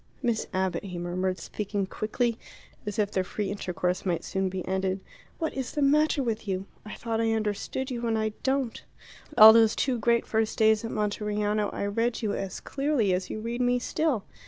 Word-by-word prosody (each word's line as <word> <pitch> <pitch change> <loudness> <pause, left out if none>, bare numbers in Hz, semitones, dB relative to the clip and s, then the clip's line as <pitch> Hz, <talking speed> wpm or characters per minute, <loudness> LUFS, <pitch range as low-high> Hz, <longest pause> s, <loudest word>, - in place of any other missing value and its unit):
"Miss 235 -3 0
Abbott," 190 +1 -1
he 180 -2 -6
murmured, 185 +2 -1
speaking 200 +2 -3
quickly, 230 +4 -1 0.5
as 210 - -3
if 205 -1 +1
their 190 - +1
free 200 +1 -3
intercourse 180 -2 -2
might 175 -3 -1
soon 190 0 -1
be 185 -1 -5
ended, 190 0 0 0.4
"what 320 -2 -2
is 265 -2 -4
the 295 - +1
matter 295 0 +3
with 225 -2 -2
you? 190 0 -2 0.2
I 210 - -8
thought 225 -1 -2
I 225 0 +2
understood 220 +5 -2
you, 240 -1 -2
and 225 -1 +1
I 220 0 +1
don't. 265 -3 -1 0.5
All 220 -1 +12
those 225 -1 +5
two 255 -3 0
great 235 +1 +2
first 220 0 0
days 220 0 +4
at 225 - -3
Monteriano 210 0 -1
I - - -3
read 230 +4 -1
you 205 -2 0
as 195 -2 -4
clearly 275 -8 +1
as 180 +1 -2
you 215 - -4
read 235 +2 -3
me 245 0 +3
still. 265 -3 0
215 Hz, 195 wpm, -27 LUFS, 195-235 Hz, 0.5 s, All